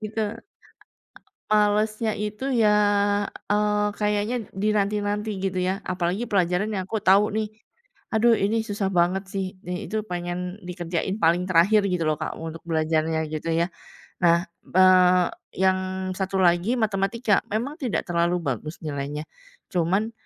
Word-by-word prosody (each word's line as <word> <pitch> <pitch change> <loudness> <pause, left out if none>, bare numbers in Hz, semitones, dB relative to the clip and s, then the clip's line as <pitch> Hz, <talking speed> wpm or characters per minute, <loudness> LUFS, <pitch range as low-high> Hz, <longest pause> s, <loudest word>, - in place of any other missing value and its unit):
gitu. 215 0 -3 1.1
Malesnya 215 +1 +2
itu 210 +5 -4 0.2
ya, 215 - +5 0.8
eee, 210 0 +2
kayaknya 210 +3 0 0.2
dinanti-nanti 205 +1 0
gitu, 190 -1 -2
ya. 185 +3 -1
Apalagi 185 +5 -2
pelajaran 185 +1 +1
yang 190 -4 -3
aku 220 +1 -3
tahu 200 +3 +4
nih. 215 -1 -1 0.6
"Aduh, 225 +1 +4
ini 220 +3 +1
susah 205 -3 -2
banget 180 +2 +2
sih." 190 -1 -3
Di 180 +3 -5
itu 215 0 -2
pengen 180 +1 -4
dikerjain 180 +1 -3
paling 170 -2 +3
terakhir, 185 +5 +5
gitu 180 -3 0
loh, 155 -1 +1
Kak, - - -4
untuk 165 0 -7
belajarnya 160 0 +1
gitu, 155 +2 -3
ya. 165 +1 +2 0.6
Nah, 170 +1 +4 0.2
eee, 185 -1 +6 0.3
yang 190 0 +4 0.4
satu 190 0 -1
lagi 180 +7 +2
matematika. 210 +1 +1
Memang 245 +8 -2
tidak 250 - -2
terlalu 175 +1 +1
bagus 155 +1 -4
nilainya, 150 0 -4 0.5
cuman 190 +6 +1
190 Hz, 135 wpm, -24 LUFS, 175-210 Hz, 1.1 s, eee